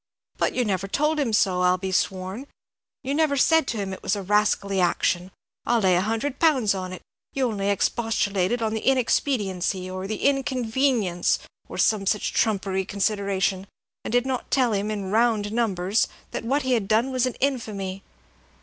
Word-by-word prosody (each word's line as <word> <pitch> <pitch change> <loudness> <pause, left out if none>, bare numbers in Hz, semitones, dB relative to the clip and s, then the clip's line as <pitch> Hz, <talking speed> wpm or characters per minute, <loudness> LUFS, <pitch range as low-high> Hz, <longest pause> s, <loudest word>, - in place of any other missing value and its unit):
"But - - +1
you 250 - +1
never 195 -2 -1
told 300 +8 0
him 265 -6 0
so, 190 -4 +2
I'll 180 0 +3
be 190 +1 -4
sworn, 190 +7 -2 0.6
you 270 +1 -2
never 300 -2 +2
said 320 +2 +4
to 230 - -2
him 195 -2 -3
it 190 - -9
was 195 - 0
a 200 - -5
rascally 200 -1 +1
action. 175 +1 +1 0.3
I'll 240 -1 +2
lay 190 -4 +3
a 175 - +3
hundred 225 +7 -2
pounds 265 -11 +3
on 185 -1 -5
it, 185 - -9 0.3
you 270 -1 0
only 200 -3 -2
expostulated 205 0 0
on 220 -1 0
the 220 - -1
inexpediency, 205 -8 0
or 185 +1 -5
the 215 +1 -4
inconvenience, 255 -8 +1 0.3
or - - -7
some 205 -3 +2
such 210 - 0
trumpery 195 -3 0
consideration, 195 -1 -1 0.4
and - - -5
did 245 +1 +2
not 260 -2 -3
tell 250 -4 +2
him, 205 +1 -1
in 200 -3 -3
round 220 -2 +2
numbers, 210 -3 +1 0.2
that - - -4
what 275 +4 +1
he 260 - -1
had 225 -6 +1
done 225 +5 +2
was 255 -1 +1
an 255 - -4
infamy." 210 -8 -2
210 Hz, 180 wpm, -24 LUFS, 190-250 Hz, 0.6 s, said